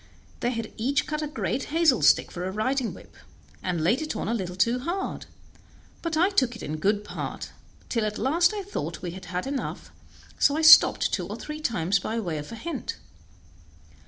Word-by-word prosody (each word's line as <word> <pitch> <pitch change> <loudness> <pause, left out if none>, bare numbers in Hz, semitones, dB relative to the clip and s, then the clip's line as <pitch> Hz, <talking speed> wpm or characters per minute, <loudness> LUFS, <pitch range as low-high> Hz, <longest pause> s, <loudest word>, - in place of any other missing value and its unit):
They 240 - 0
had 230 -2 -4
each 280 +5 +1
cut 305 0 -3
a 305 - -2
great 275 -2 -2
hazel 315 -5 +3
stick - - +4
for 175 - -5
a 190 - -2
riding 250 +5 0
whip, - - -15 0.5
and 175 -4 -2
laid 230 - +2
it 310 - -3
on - - -3
a 230 - 0
little 185 -6 -3
too 230 +7 +2
hard; 345 +9 -4 0.7
but 330 -2 -2
I 365 +5 +3
took 255 - +2
it 225 - -9
in 155 +1 -4
good 205 +5 +1
part, - - -6 0.4
till 230 -3 0
at 210 - -4
last 340 +7 +3
I 415 -2 -4
thought 400 - -5
we 175 - -3
had 185 +2 -9
had 180 +1 -3
enough, 270 -1 -4 0.5
so 285 +1 +4
I 320 - 0
stopped 315 - +8
two - - -1
or - - -5
three 300 0 -7
times 200 - +1
by 220 +4 -3
way 170 -8 -3
of 145 - -8
a - - -6
hint. 290 +4 -5
245 Hz, 205 wpm, -26 LUFS, 195-305 Hz, 0.7 s, stopped